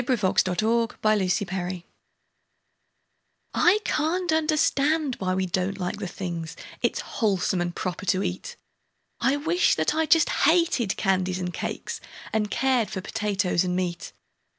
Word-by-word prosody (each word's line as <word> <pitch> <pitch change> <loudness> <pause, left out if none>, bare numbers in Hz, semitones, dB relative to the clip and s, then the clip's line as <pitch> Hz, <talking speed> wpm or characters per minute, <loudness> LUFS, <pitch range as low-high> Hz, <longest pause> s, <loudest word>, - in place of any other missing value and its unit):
Edgar 245 +1 +1
Fawcett 185 -1 +1
A 230 +1 +1 0.3
Sad 195 +2 0
Case 180 -1 -3 1.7
I 385 +4 +4
CAN'T 340 +3 0
understand 305 -2 +2
why 185 -1 0
we 190 0 0
don't 185 +2 -1
like 180 +3 -3
the 200 -2 -4
things 170 -3 -5 0.3
It's - - 0
wholesome 190 -4 0
and 175 0 -3
proper 185 +2 -4
to 185 +3 +2
eat; - - -4 0.6
I 265 - +2
wish 330 +5 +2
that - - +1
I 320 0 +1
just 320 0 +5 0.2
hated 325 - +2
candies 185 -2 +1
and 180 -1 -4
cakes, - - -5 0.3
And 215 -1 0
cared 250 -1 +1
for 190 - -4
potatoes 200 -4 0
and 180 -1 -1
meat. 175 -2 -3
205 Hz, 145 wpm, -25 LUFS, 185-285 Hz, 1.7 s, just